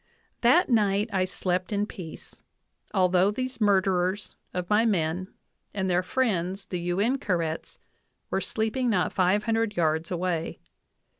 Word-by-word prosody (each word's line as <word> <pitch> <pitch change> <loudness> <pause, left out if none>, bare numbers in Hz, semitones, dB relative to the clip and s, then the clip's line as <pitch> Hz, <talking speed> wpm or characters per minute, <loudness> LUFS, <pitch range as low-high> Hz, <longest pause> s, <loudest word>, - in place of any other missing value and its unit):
"That 265 +10 +5
night 210 -2 +2
I 185 -1 +2
slept 185 0 -2
in 205 0 +1
peace, 180 -7 -10 0.6
although 185 -1 +3
these 255 +3 -4
murderers 190 -1 +1 0.2
of 180 -1 -3
my 210 +3 +4
men, 180 -4 0 0.5
and 190 -2 0
their 180 +1 +3
friends, 195 -3 -1
the 180 - -4
U 175 +2 -1
in 250 +6 +2
ka 200 - -1
rets, 165 -2 -3 0.5
were - - 0
sleeping 230 +3 -1
not 185 -5 +1
five 190 +3 +2
hundred 225 -3 0
yards 160 0 +1
away. 175 -2 -2
190 Hz, 145 wpm, -27 LUFS, 180-215 Hz, 0.6 s, That